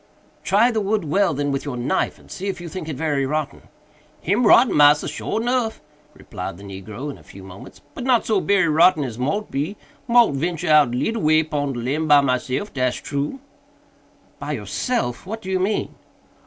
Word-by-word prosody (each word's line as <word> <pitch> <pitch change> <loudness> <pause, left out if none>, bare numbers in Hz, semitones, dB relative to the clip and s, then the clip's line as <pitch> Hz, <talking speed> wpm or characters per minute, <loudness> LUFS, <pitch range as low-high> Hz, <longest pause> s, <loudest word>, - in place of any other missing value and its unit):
"Try 215 +6 +3
the 220 -2 -1
wood 205 -2 -1
well, 190 +5 +2
then, 145 0 -1
with 135 - -2
your 140 -4 -5
knife, 125 +10 -1
and - - -19
see 195 +1 -5
if 190 -2 -3
you 175 - -7
think 165 -1 -6
it 150 - -4
very 145 -1 -1
rotten." 155 +1 -3 0.6
"Him 210 +7 +1
rotten, 240 +4 +6
massa, 150 0 +5
sure 150 +8 -3
nuff," 240 -1 -1 0.4
replied - - -7
the 100 - -13
negro 100 +8 -7
in - - -12
a - - -18
few 95 - -13
moments, 95 0 -12
"but - - -7
not 250 -2 +2
so 210 -4 +1
berry 200 -3 +2
rotten 160 0 +4
as 120 -3 -6
mought 200 +12 -2
be. 155 +9 -3 0.3
Mought 235 -6 +5
ventur 160 +4 -2
out 150 -4 +6
leetle 225 - -1
way 155 +1 +4
pon 145 -3 -2
de - - -6
limb 145 +7 -2
by 145 -1 +7
myself, 130 +8 -2
dat's 125 -2 0
true." 145 - -4 1.0
"By - - -4
yourself!—what 225 - -3
do 190 - -5
you 185 - +1
mean?" 200 +3 -1
155 Hz, 195 wpm, -21 LUFS, 140-200 Hz, 1.0 s, by